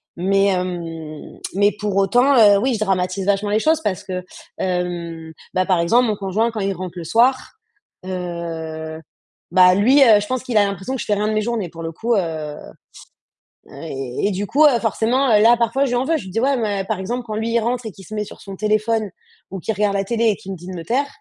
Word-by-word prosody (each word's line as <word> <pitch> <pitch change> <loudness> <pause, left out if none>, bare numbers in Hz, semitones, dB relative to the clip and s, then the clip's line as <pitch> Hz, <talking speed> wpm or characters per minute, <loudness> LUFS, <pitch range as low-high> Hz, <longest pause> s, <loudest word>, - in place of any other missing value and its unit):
mais 195 +3 +2
hem 170 -5 -4 0.2
mais 205 +2 +3
pour 205 -2 -2
autant, 245 +8 +4
heu, 205 -3 +7
oui, 255 +2 +1
je - - -4
dramatise 190 -2 -1
vachement 200 +1 +1
les 210 +1 +2
choses 315 +6 +2
parce 195 - -2
que, 180 -1 -4 0.3
hem, 170 -3 -3 0.2
bah, 185 0 +1
par 185 -2 +2
exemple, 235 +9 +3
mon 215 - 0
conjoint 200 +3 0
quand 220 -2 -5
il 195 0 0
rentre 180 -1 -7
le 175 - -5
soir, 245 +9 +2 0.5
heu, 165 -3 -5 0.5
bah, 180 0 +6
lui, 255 +9 +4
heu, 220 -5 +7
je 205 - -5
pense 255 +1 -2
qu'il 245 -4 -1
a 210 - +6
l'impression 200 +5 -4
que - - -5
je - - -5
fais 210 - +1
rien 210 +1 -1
de 215 - 0
mes 215 - +1
journées 220 -5 -2
pour 165 0 -9
le 165 - -4
coup, 230 +8 -1
heu. - - +3 1.5
Heu, - - -17
et 135 0 -4
et - - 0
du 195 +2 -2
coup, 290 +8 +3
heu, 265 -5 +5
forcément, 235 +4 +1
heu, 210 - +5
là 235 +2 +6
parfois 235 +4 +1
je - - -2
lui - - +1
en 245 +2 0
veux, 325 +3 +1
je - - -7
lui - - -8
dis: 225 - -1
«Ouais, 275 +2 +2
mais» 205 -4 -1
par 215 -3 -2
exemple, 240 +6 -3
quand 215 - -4
lui, 225 +2 -2
il 235 - +3
rentre 240 +2 -2
et - - -6
qu'il 195 0 -14
se 215 - -10
met 210 - -1
sur - - -12
son 195 -1 -8
téléphone 215 +1 0 0.4
ou 195 - -5
qu'il 220 - -2
regarde 205 0 +1
la 195 - +1
télé 230 +2 0
et 215 - +3
qu'il 195 - -9
me - - -7
dit 175 +2 -12
de 185 - -6
me 170 - -6
taire, 265 +9 0
205 Hz, 250 wpm, -20 LUFS, 180-230 Hz, 1.5 s, heu